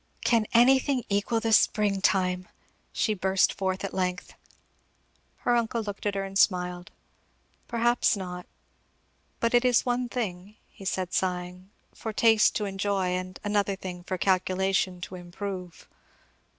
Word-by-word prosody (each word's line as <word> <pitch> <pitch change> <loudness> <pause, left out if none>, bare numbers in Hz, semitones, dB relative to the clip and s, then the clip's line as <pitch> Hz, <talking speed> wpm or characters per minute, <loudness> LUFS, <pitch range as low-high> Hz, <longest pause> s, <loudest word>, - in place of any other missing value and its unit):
"Can 230 -3 +3
anything 260 +2 +4
equal 205 +3 +1
the 225 0 0
spring 205 -2 +3
time!" 185 -2 +1 0.4
she 215 - 0
burst 190 -1 +2
forth 190 0 -2
at 195 - -4
length. 180 -1 -2 1.1
Her 245 - +3
uncle 230 -1 0
looked 205 0 -5
at 200 - -1
her 195 - -1
and 195 0 -3
smiled. 180 -2 +1 0.8
"Perhaps 240 -1 +2
not; 180 -2 -6 0.9
but 230 +1 0
it 240 0 +5
is 250 -2 +3
one 245 0 -1
thing," 205 -4 -4 0.3
said 185 -1 -2
he - - -15
sighing, 180 0 -2 0.2
"for 220 - -5
taste 220 0 +4
to 210 - -1
enjoy 195 -1 -1
and 185 0 -4
another 205 -1 0
thing 180 -2 -7
for 185 +1 -3
calculation 185 0 +1
to 175 - -7
improve." 180 -1 -7
195 Hz, 140 wpm, -27 LUFS, 185-220 Hz, 1.1 s, it